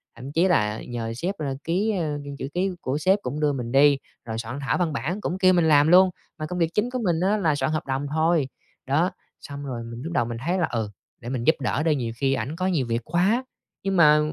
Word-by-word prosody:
thậm 135 +3 -8
chí 170 +5 +3
là 105 - +1
nhờ 115 -2 -4
sếp, 180 +9 -2
a, 140 -3 -2
ký, 195 +6 +1
a, 150 -3 -1 0.2
chữ 135 - -3
ký 185 +2 +1
của 130 +3 -1
sếp 190 +6 +3
cũng 150 - -4
đưa 150 -1 +2
mình 120 -3 -4
đi, 140 +1 +5 0.3
rồi 110 -1 -4
soạn 120 +4 -5
thảo 135 - 0
văn 170 -4 0
bản 180 +8 -3
cũng 185 - -2
kêu 185 -1 +5
mình 170 -2 +3
làm 145 -1 +5
luôn, 185 +2 +7 0.3
mà 155 - -4
công 180 +3 -4
việc 165 0 +1
chính 220 +4 +1
của 255 - -2
mình 165 -2 +2
á, 200 +4 +2
là 155 -7 +2
soạn 155 - 0
hợp 155 - -2
đồng 135 +2 -1
thôi. 160 -3 +2 0.4
Đó, 160 +8 +2 0.3
xong 140 0 -7
rồi 120 -3 -4
mình 115 +1 -8
lúc 170 +1 -5
đầu 120 - +2
mình 115 0 -5
thấy 185 +2 +1
là 165 - +2
"Ừ, 110 -3 -2 0.3
để 120 - -6
mình 125 -3 -2
giúp 160 - +4
đỡ 140 +3 0
đi, 160 -2 +3
nhiều 120 -4 -2
khi 135 +2 +1
ảnh 145 +3 -3
có 185 +2 -1
nhiều 155 -9 +1
việc 115 +1 -1
quá" 200 +9 +2 0.4
nhưng 195 -1 0
mà, 150 -2 +7
150 Hz, 260 wpm, -24 LUFS, 130-180 Hz, 0.4 s, luôn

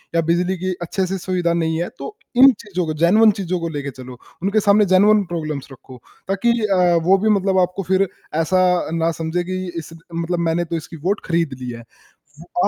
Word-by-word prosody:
या 165 - +4
बिजली 180 +2 +1
की 185 +1 -2
अच्छे 185 +2 -2
से 195 +1 -2
सुविधा 180 -2 -1
नहीं 165 -1 0
है, 175 - -3
तो 425 - -7 0.2
इन 265 +2 +8
चीज़ों 185 -5 -3
को, 155 - -2
जेन्युइन 215 +6 +6
चीज़ों 180 -1 -2
को 165 0 -3
लेके 145 -1 -3
चलो। 125 -1 -9 0.3
उनके 200 +3 +2
सामने 210 +1 +5
जेन्युइन 205 +2 +5
प्रॉब्लम्स 155 -4 -4
रखो, 130 0 -13 0.3
ताकि 195 +5 +1
अ, 180 -4 +3
वो 190 +3 +5
भी 215 +3 0
मतलब 195 -2 +2
आपको 180 +2 -6
फिर 190 +1 +3 0.3
ऐसा 185 +3 +2 0.3
ना 165 0 +1
समझें 165 +2 -1
कि 185 +1 -3 0.2
इस 165 0 -7 0.2
मतलब, 170 +1 -2
"मैंने 170 +1 0
तो 165 - -4
इसकी 165 +1 -7
वोट 205 +2 0
खरीद 165 -4 0
ली 125 - -5
है।" 115 0 -9 0.6
वो 350 - -1
175 Hz, 205 wpm, -20 LUFS, 165-195 Hz, 0.6 s, इन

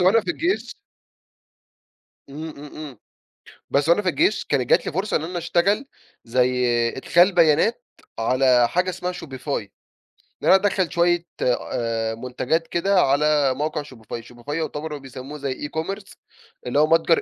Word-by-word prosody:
وأنا 190 +6 +5
في 345 - -3
الجيش. 345 +3 -1 1.5
إمم، 155 +3 -7
إمم، 150 0 -11
إمم، 145 -7 -8 0.7
بس 145 +3 +2
وأنا 175 +5 +4
في 185 - 0
الجيش 180 +6 +1
كانت 130 -4 -1
جات - - +4
لي - - -2
فرصة 190 +5 0
إن 155 - -2
أنا 175 +1 -4
اشتغل، 180 +9 +1 0.4
زي 125 +1 +1 0.3
إدخال 175 +8 +4
بيانات، 170 +7 +3 0.3
على 125 +1 +3
حاجة 180 +8 0
اسمها 180 0 -4
Shopify، 135 -6 -9 0.9
إن - - -2
أنا - - +8
أدَخَّل 195 -3 +1
شوية 175 0 +2 0.2
آآ 115 -2 -1
منتجات 130 +7 -2
كده 190 +2 +2
على 145 -1 +3
موقع 150 +2 -2
Shopify 115 -4 -9
،Shopify 120 +4 -8
يعتبر 155 -1 -3
بيسموه 135 +1 -9
زي 140 0 -4
e-commerce 195 +6 -5 0.5
اللي 125 +4 +1
هو 155 - +5
متجر 165 +1 +3
150 Hz, 145 wpm, -23 LUFS, 130-175 Hz, 1.5 s, أنا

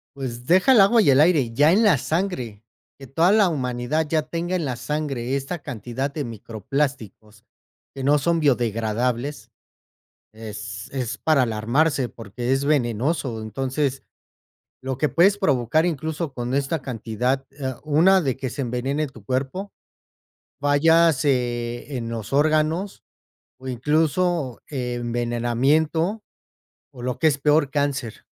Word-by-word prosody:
Pues 125 -3 -6
deja 185 - +5
el 220 - +7
agua 225 +4 +5
y 180 - +3
el 135 - +5
aire, 150 -7 +3
ya 145 +5 +4
en 210 +6 +4
la 200 -9 +5
sangre 130 - -3 0.4
que 135 - -10
toda 165 +9 +3
la 210 -3 +4
humanidad 130 +1 -1
ya 155 +1 +1
tenga 170 +4 -3
en 175 - -1
la 130 -4 -2
sangre 135 -1 -3
esta 140 +6 -3
cantidad 130 +2 -4
de 150 - -3
microplásticos 110 -1 -4 0.5
que 135 - -5
no 145 +2 +4
son 170 +4 +1
biodegradables 120 -1 -1 0.8
es 105 -1 -8
es 130 -2 -3
para 155 -4 +3
alarmarse 125 +5 +1
porque 120 +3 -5
es 135 +1 +1
venenoso, 125 -2 0
entonces 135 +5 -2 0.8
lo 130 -1 -4
que 150 0 +1
puedes 195 +8 +4
provocar 145 - +2
incluso 160 -1 -3
con 125 0 -4
esta 140 +2 -1
cantidad, 125 +2 -2
eh, 135 -1 -4
una 170 +6 +4
de 135 -5 -1
que 135 -1 -4
se 140 - -5
envenene 135 +5 -2
tu 120 -6 -15
cuerpo, 135 - -3 0.9
fallas, 155 +1 +4
eh, 120 0 -1
en 115 -2 -4
los 115 -1 -6
órganos 155 +6 +1 0.6
o 130 - -8
incluso 150 +2 0
envenenamiento 125 - 0 0.7
o 125 - -11
lo 125 0 -3
que 160 - +2
es 140 -2 0
peor 150 0 +2
cáncer. 135 -5 -2
135 Hz, 140 wpm, -23 LUFS, 120-155 Hz, 0.9 s, el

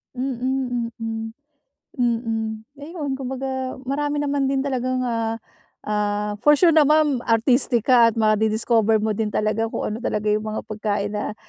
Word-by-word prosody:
Mm, 250 -2 -2
mm, 225 0 -4 0.7
mm, 230 -2 0 0.3
ayun 295 -2 -5
kumbaga 260 0 -4
marami 290 +2 -1
naman 280 -1 0
din 270 0 0
talagang, 255 -1 -1
ah, 230 -2 -1 0.5
ah 210 0 -1
for 295 - +8
sure 335 +2 +5
naman 300 -3 +4
artistic 235 +1 +2
ka 235 -3 +6
at - - -18
ma-di-discover 220 0 +2
mo 220 - +1
din 220 -1 0
talaga 215 +1 0
kung - - -4
ano 215 - -3
talaga 210 -3 -1
yung 215 +1 0
mga 215 - -3
pagkain 210 -1 -2
na, 210 0 -3
235 Hz, 145 wpm, -22 LUFS, 220-265 Hz, 0.7 s, for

